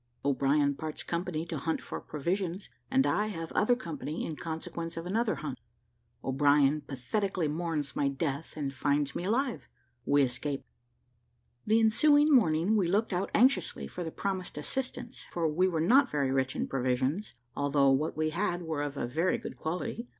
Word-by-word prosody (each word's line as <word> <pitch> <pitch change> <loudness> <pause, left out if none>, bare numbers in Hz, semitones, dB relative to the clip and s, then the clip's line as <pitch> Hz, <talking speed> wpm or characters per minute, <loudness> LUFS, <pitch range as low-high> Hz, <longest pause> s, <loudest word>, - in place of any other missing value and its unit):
O'BRIEN 140 +1 +3
PARTS 155 -1 -5
COMPANY 170 -2 -2
TO 165 -3 -4
HUNT 160 +4 -1
FOR - - -6
PROVISIONS, 175 +5 -3 0.2
AND 270 0 +3
I 210 +1 +1
HAVE 165 -6 -5
OTHER 245 +3 +3
COMPANY 245 - -5
IN 160 - -4
CONSEQUENCE 165 +1 -5
OF 165 - -4
ANOTHER 220 +4 +1
HUNT 140 -5 -5 0.6
O'BRIEN 145 +2 +3
PATHETICALLY 175 - -1
MOURNS 155 -3 -2
MY 140 - +1
DEATH 140 +2 -3
AND 140 -2 -2
FINDS 145 +2 0
ME 175 - -3
ALIVE 245 +4 -1 0.4
WE 145 0 +5
ESCAPE. 135 +2 -2 1.0
The 220 +1 +5
ensuing 290 +7 +5
morning 180 - +4
we 195 -5 +2
looked 205 +4 +1
out 180 +2 -1
anxiously 260 +5 +3
for 180 - -6
the 165 - -3
promised 190 -1 -3
assistance, 250 - -4
for 170 -2 0
we 170 +5 +2
were 170 -4 -1
not 255 - +5
very 140 -3 0
rich 130 -1 0
in - - -1
provisions, 130 - -1 0.2
although 140 -1 +3
what 150 +4 0
we 155 0 +1
had 175 0 -1
were 160 -3 -2
of 145 -1 -3
a - - -1
very 160 +9 +1
good - - -7
quality. 180 +8 -4
165 Hz, 170 wpm, -30 LUFS, 145-200 Hz, 1.0 s, WE